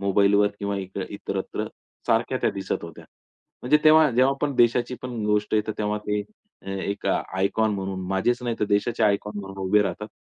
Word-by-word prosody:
मोबाईलवर 100 Hz, +1 st, +3 dB
किंवा 100 Hz, 0 st, -2 dB
इत्र 95 Hz, -1 st, -5 dB
इतरत्र -, -, -4 dB, 0.4 s
सारख्या -, -, +1 dB
त्या -, -, +2 dB
दिसत 95 Hz, -1 st, -3 dB
होत्या. -, -, -10 dB, 0.6 s
म्हणजे 150 Hz, +5 st, +4 dB
तेव्हा, 155 Hz, -1 st, +7 dB
जेव्हा 130 Hz, +3 st, +3 dB
आपण 140 Hz, 0 st, -2 dB
देशाची 120 Hz, +1 st, +3 dB
पण 120 Hz, -4 st, -4 dB
गोष्ट 105 Hz, +1 st, +1 dB
येते 110 Hz, 0 st, +1 dB
तेव्हा 105 Hz, 0 st, -1 dB
ते 105 Hz, 0 st, 0 dB, 0.4 s
अ, -, -, -9 dB
एक 100 Hz, +1 st, -3 dB
आयकॉन 100 Hz, +4 st, 0 dB
म्हणून 95 Hz, -1 st, -4 dB
माझेच 120 Hz, +6 st, 0 dB
नाही, 120 Hz, -2 st, -2 dB
तर 105 Hz, -, +3 dB
देशाचे 105 Hz, +3 st, 0 dB
आयकॉन 105 Hz, 0 st, 0 dB
म्हणून 95 Hz, 0 st, -9 dB
उभे 105 Hz, +2 st, +4 dB
राहतात. 100 Hz, +3 st, -4 dB
105 Hz, 175 wpm, -25 LUFS, 100-120 Hz, 0.6 s, तेव्हा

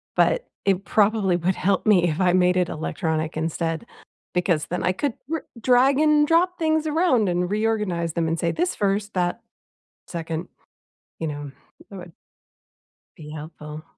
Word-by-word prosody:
but -, -, +2 dB, 0.2 s
it 195 Hz, -1 st, +2 dB
probably 210 Hz, -3 st, +2 dB
would 175 Hz, +2 st, 0 dB
help 195 Hz, 0 st, 0 dB
me 195 Hz, -5 st, +5 dB
if 155 Hz, -, -3 dB
I 180 Hz, -2 st, +3 dB
made 180 Hz, 0 st, +3 dB
it 180 Hz, -1 st, +1 dB
electronic 160 Hz, 0 st, -2 dB
instead, 165 Hz, +3 st, -2 dB, 0.5 s
because 175 Hz, -3 st, +1 dB
then 180 Hz, -, -3 dB
I 180 Hz, -, +2 dB
could 275 Hz, +6 st, -1 dB, 0.2 s
r 325 Hz, -, -2 dB, 0.2 s
drag 260 Hz, +4 st, +4 dB
and 300 Hz, -1 st, +4 dB
drop 355 Hz, +3 st, +3 dB
things 315 Hz, -1 st, +1 dB
around 300 Hz, -, +2 dB
and 180 Hz, +1 st, 0 dB
reorganize 210 Hz, -6 st, 0 dB
them 165 Hz, -1 st, 0 dB
and 165 Hz, +1 st, -1 dB
say 170 Hz, -, +1 dB
"This 355 Hz, +2 st, -1 dB
1st, 200 Hz, +1 st, -1 dB
that 180 Hz, +4 st, -1 dB, 0.7 s
2nd." 165 Hz, 0 st, -5 dB, 0.7 s
You 160 Hz, -, -2 dB
know, 145 Hz, -1 st, -5 dB, 0.4 s
that 200 Hz, -, -8 dB
would 175 Hz, -2 st, -10 dB, 1.0 s
be 155 Hz, -4 st, -11 dB
helpful. 150 Hz, 0 st, -8 dB
180 Hz, 160 wpm, -23 LUFS, 165-225 Hz, 1.0 s, me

